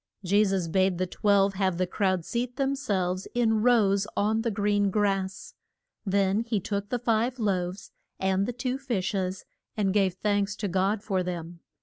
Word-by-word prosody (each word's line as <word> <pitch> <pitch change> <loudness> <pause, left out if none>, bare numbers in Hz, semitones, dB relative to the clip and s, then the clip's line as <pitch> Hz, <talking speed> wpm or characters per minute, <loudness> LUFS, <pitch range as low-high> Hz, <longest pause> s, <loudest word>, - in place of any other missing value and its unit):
Je 200 +3 +4
sus 190 -4 0
bade 185 +1 +2
the 185 - 0
twelve 200 +1 +2
have 190 -2 0
the 185 - +1
crowd 185 -2 0
seat 245 +1 -3
them 275 0 0
selves 190 -8 -1
in 225 -3 +2
rows 205 -4 +3
on 215 +2 +2
the 230 - 0
green 205 -1 +1
grass. 195 -2 -1 0.5
Then 195 +1 +2
he 230 -2 -1
took 200 +1 -3
the 245 - 0
five 235 +1 0
loaves 190 -4 -2 0.3
and 190 +1 +1
the - - -1
two 255 +2 -3
fish 235 -10 -2
es, 185 -1 -2 0.3
and 195 -3 +1
gave 195 -3 +2
thanks 205 +1 0
to 205 - -3
God 195 +3 0
for 195 -4 0
them. 175 -1 -5
200 Hz, 180 wpm, -27 LUFS, 190-220 Hz, 0.5 s, Je